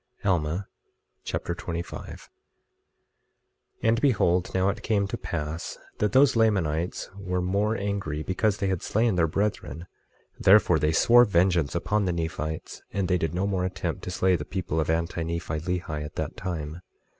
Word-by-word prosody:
Alma 90 0 0 0.6
Chapter 85 - -3
25 85 0 -5 0.2
25:1 - - -20 1.5
And 115 +1 +3
behold, 90 -10 +2
now 95 +1 +2
it 100 - -3
came 100 -3 +1
to - - -3
pass 80 -1 -4 0.2
that 105 - +1
those 135 -1 +5
Lamanites 90 -7 +1
were 90 -2 -2
more 100 +5 +1
angry 100 -7 -2
because 100 +3 0
they 100 - -2
had 95 -3 -1
slain 115 +1 +1
their 85 -2 +2
brethren; 85 -4 -2 0.5
therefore 95 -4 +5
they 75 +2 +2
swore 120 +9 +6
vengeance 85 -7 +2
upon 105 +4 +1
the 90 - 0
Nephites; 80 -2 -4
and 100 -2 -1
they 90 0 +2
did 80 +1 -2
no 95 +2 0
more 95 -2 0
attempt 90 -2 -3
to - - -4
slay 90 +1 +2
the 75 - -3
people 85 -2 -3
of 80 - -1
Anti 85 +1 0
Nephi 80 -1 -3
Lehi 80 -3 -3
at 75 - -8
that - - -3
time. 85 -2 -5
90 Hz, 165 wpm, -26 LUFS, 80-100 Hz, 1.5 s, swore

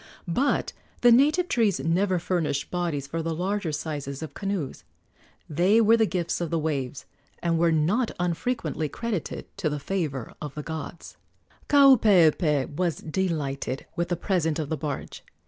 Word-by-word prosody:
But 260 +12 0 0.3
the 245 - +7
native 300 +9 +4
trees 220 - +2
never 180 +6 +1
furnished 165 -5 -1
bodies 170 -6 -2
for 165 +4 -3
the 165 0 -2
larger 190 0 -1
sizes 145 -2 -4
of 150 -3 -7
canoes. 195 -8 -4 0.6
They 180 +8 +3
were 225 0 +6
the 225 -1 +3
gifts 175 -2 -2
of 170 - -2
the 165 - 0
waves, 145 -4 -2 0.4
and 165 -1 +1
were 170 0 +4
not 180 +10 +2
unfrequently 175 -2 -1
credited 220 -1 -4
to 185 -6 0
the 150 - -2
favor 145 -6 -3
of 150 -2 -6
the 150 - -5
gods. 160 +2 -7 0.5
Kaupeepee 180 - +5
was 175 -1 0
delighted 150 -7 -2
with 170 -1 -1
the 175 - +1
present 165 -5 0
of 150 -3 -3
the 160 - -1
barge. 145 -3 -5
170 Hz, 155 wpm, -26 LUFS, 150-195 Hz, 0.6 s, the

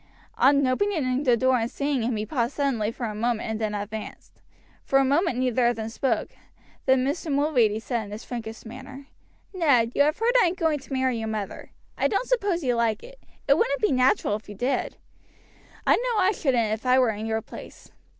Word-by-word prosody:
On 280 0 +5
opening 265 -3 0
the 245 -2 +4
door 260 +1 +3
and 225 +1 -1
seeing 280 -1 -1
him 230 +1 -1
he 210 0 -2
paused 235 0 -2
suddenly 245 -7 0
for 235 - -5
a 215 - -4
moment 230 +1 -1
and 220 0 -3
then 210 -1 -1
advanced. 210 +1 -7 0.5
For 270 - +2
a 270 - +4
moment 285 0 +1
neither 250 -1 +2
of 240 - +1
them 220 0 -5
spoke, 255 +3 -1 0.6
then 260 -1 +4
Mr. 295 +3 -2
Mulready 265 -7 +2
said 230 -1 -3
in 205 - -11
his 210 +3 -7
frankest 225 -2 -7
manner: 265 +4 -10 0.5
"Ned, 275 -11 +3
you - - +2
have 300 +3 +3
heard 460 +2 +1
I - - +4
am 340 - -2
going 320 -4 0
to 270 - -17
marry 260 -3 0
your 220 - -3
mother. 215 -2 -5 0.3
I - - +3
don't 425 +5 -1
suppose 400 -9 0
you 250 -2 +1
quite 235 0 +1
like 220 -2 -1
it; - - -13 0.3
it - - +4
wouldn't - - +1
be 425 - +2
natural 255 -5 +2
if 215 - -17
you 205 - -8
did; 250 +7 -2 0.9
I - - +5
know 485 -1 -1
I 385 0 +4
shouldn't 245 - 0
if 220 - -5
I 255 0 +4
were 250 -3 +4
in 215 +1 -5
your 220 0 -1
place. - - -12
255 Hz, 220 wpm, -25 LUFS, 225-290 Hz, 0.9 s, On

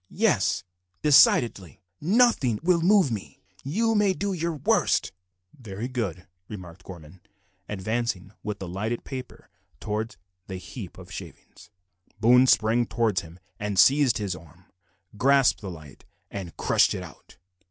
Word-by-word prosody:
"Yes, 145 - +2 0.4
decidedly. 120 - +4 0.2
Nothing 175 - +3
will 175 -1 +3
move 185 - +4
me. 105 -4 -6 0.2
You 225 +11 0
may 205 -3 +3
do 200 +1 -2
your 170 -2 -2
worst." 145 - +1 0.4
"Very 110 -1 -6
good," 100 - -4 0.2
remarked 90 -3 -10
Gorman, 85 -1 -12 0.5
advancing 105 -1 -3
with 105 -1 -4
the 95 - -7
lighted 110 +7 -3
paper 130 -2 -8 0.3
towards 105 -2 -4 0.3
the 95 - -5
heap 95 0 -9
of - - -12
shavings. - - -11 0.5
Boone 125 +4 +5
sprang 115 0 +3
towards 110 -6 0
him, 85 +1 -13 0.2
and, 105 -1 -3
seizing 130 +1 +4
his 95 -3 -2
arms, 85 +2 -16 0.5
grasped 135 +2 +3
the 100 - -6
light 75 -6 -12 0.3
and 95 -4 -7
crushed - - +3
it - - -5
out. - - -15
110 Hz, 135 wpm, -26 LUFS, 95-140 Hz, 0.5 s, Boone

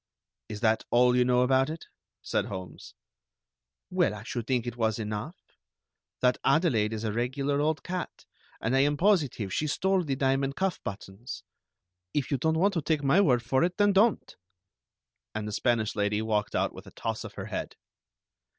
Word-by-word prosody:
"Is 105 0 -6
that 110 -1 +2
all 125 +1 +4
you 125 - +4
know 125 0 +3
about 130 +2 +3
it?" 160 +1 -6 0.4
said - - 0
Holmes. 95 -5 -8 1.0
"Well, 105 - +2
I 105 - -9
should 120 0 -5
think 125 -3 0
it 120 -1 -4
was 110 -2 0
enough. 110 - -4 0.9
That 125 0 +3
Adelaide 125 -11 +3
is 110 0 -4
a 110 - -1
regular 135 +5 0
old 155 +1 0
cat, 180 0 -5 0.3
and 115 +4 0
I - - +4
am 145 +2 +2
positive 150 - +1
she 155 - 0
stole 190 +4 +1
the 140 -4 -1
diamond 135 0 0
cuff 190 -1 -1
buttons. 100 +3 -7 0.7
If 145 -1 -1
you 140 - +1
don't 160 +3 +1
want 195 +4 +3
to 165 - 0
take 150 0 0
my 140 +8 +4
word 125 -10 +3
for 130 +5 +2
it, 180 +1 0
then 205 -1 +4
don't!" 210 +4 +2 1.0
And 110 -1 -3
the - - -4
Spanish 110 0 0
lady 105 +1 0
walked 105 -2 -1
out - - 0
with - - -11
a - - -11
toss - - -3
of - - -9
her - - -5
head. - - -5
130 Hz, 185 wpm, -28 LUFS, 110-155 Hz, 1.0 s, all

